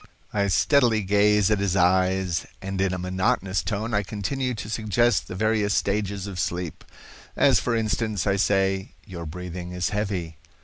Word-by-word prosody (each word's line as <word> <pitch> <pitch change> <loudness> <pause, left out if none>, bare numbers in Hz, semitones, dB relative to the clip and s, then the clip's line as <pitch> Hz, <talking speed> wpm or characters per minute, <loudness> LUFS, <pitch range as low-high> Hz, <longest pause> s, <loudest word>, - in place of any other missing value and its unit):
I 100 -1 +1
steadily 115 +1 +3
gaze 105 +1 +3
at 105 - +2
his 100 -2 0
eyes, 95 -1 +2
and 95 0 -4
in 95 -1 +1
a 95 - -2
monotonous 95 0 0
tone 105 +6 -3
I 100 - +3
continue 120 +6 -3
to 105 - -6
suggest 115 +2 +1
the - - -6
various 105 0 +1
stages 100 -1 -1
of 95 -3 -6
sleep. 85 +1 -3 0.5
As 135 -5 +4
for 120 - -1
instance, 110 -3 -1
I 100 -1 +2
say, 95 -1 +1
'Your 85 -3 -7
breathing 90 +2 -6
is 90 +1 -1
heavy. 100 -6 -3
100 Hz, 165 wpm, -25 LUFS, 90-105 Hz, 0.5 s, As